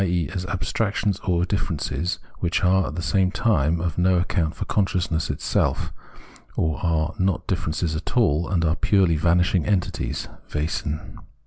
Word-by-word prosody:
e. 85 -4 +1
as 90 -1 -3
abstractions 100 +2 -1
or 90 -2 +1
differences, 85 -4 -2 0.2
which 85 +3 0
are, 95 0 +3
at 75 - -5
the 85 - -3
same 90 +4 +2
time, 90 - +2
of 85 -1 -2
no 90 +1 +4
account 85 -2 0
for - - -4
consciousness 90 -5 0
itself, - - 0 0.6
or 80 +2 0
are 80 -2 +1
not 95 -2 +1
differences 80 +1 -1
at 80 - -4
all, 85 -8 +3
and 85 -4 +1
are 80 +1 +2
purely 95 -5 +3
vanishing 85 +2 +3
entities 100 -4 -1 0.3
(Wesen). 75 0 -3
85 Hz, 150 wpm, -24 LUFS, 80-95 Hz, 0.6 s, no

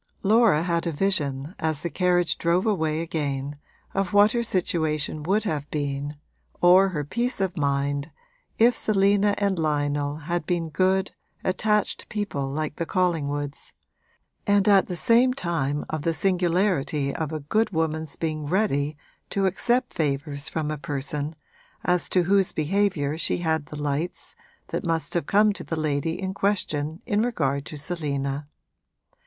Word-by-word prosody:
Laura 210 -6 +4
had 170 -1 0
a - - 0
vision, 150 -4 -1
as 155 -2 -1
the 170 - -1
carriage 180 -2 +1
drove 170 +4 +2
away 160 -7 +1
again, 145 -3 -3 0.3
of 195 0 -1
what 205 +1 +6
her 240 - 0
situation 160 -7 0
would 195 +7 +1
have 150 -8 -3
been, 145 0 -3 0.4
or 185 +2 +6
her 150 -5 -2
peace 240 - -2
of 190 -2 -1
mind, 140 -1 0 0.5
if 235 +2 +5
Selina 200 0 +3
and 200 -3 0
Lionel 145 -2 0
had 165 +1 -3
been 170 -2 0
good, 190 +4 +1 0.3
attached 210 +3 0
people 195 -11 -2
like 150 +1 -3
the 170 - -1
Collingwoods, 145 -5 -1 0.7
and 205 -1 +3
at 200 -2 +5
the 180 - -4
same 240 +7 +4
time 150 - -1
of 155 -1 -3
the 165 +2 0
singularity 175 -6 +1
of 160 -2 -3
a 155 - -3
good 215 +10 +1
woman's 160 -3 -2
being 155 -2 -3
ready 150 -5 0 0.3
to 195 -1 0
accept 240 +7 +1
favours 145 -1 -2
from 155 -2 -2
a 155 - -4
person 145 +2 -3 0.5
as 180 -1 +1
to 180 - +3
whose 195 +1 +3
behaviour 160 -3 0
she - - +1
had 160 -4 -1
the 150 - -7
lights 145 +4 -3 0.3
that - - -3
must 165 -2 -1
have 170 -5 -1
come 210 +1 +4
to - - -6
the 165 - -3
lady 155 +1 -1
in 190 0 -3
question 160 -6 -1
in 205 +1 +1
regard 140 - -1
to 155 - -7
Selina. 145 -3 -2
165 Hz, 155 wpm, -25 LUFS, 145-195 Hz, 0.7 s, what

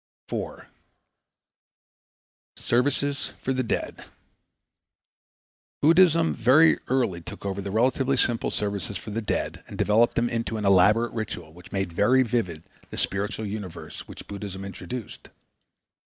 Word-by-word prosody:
4. - - -5 1.9
Services 140 +3 0
for 130 - -1
the 130 - 0
Dead 115 - -3 1.8
Buddhism 165 +1 +5
very 130 +8 +5
early 120 -10 0
took 85 - -9
over 100 0 -2
the 100 - -5
relatively 130 +5 +2
simple 120 -2 +2
services 100 -1 -2
for 105 - -8
the 115 +2 -2
dead 105 - -2
and - - -9
developed 110 +3 +3
them 120 0 +2
into 115 -1 -2
an 105 - -3
elaborate 100 +5 +5
ritual 90 -8 -5
which 90 +1 -15
made 95 -3 -2
very 130 +9 +4
vivid 105 -10 -2 0.3
the - - -8
spiritual 100 +3 -1
universe 100 -4 -7
which - - -9
Buddhism 100 -1 -6
introduced. 110 +4 -7
110 Hz, 125 wpm, -26 LUFS, 100-125 Hz, 1.9 s, Buddhism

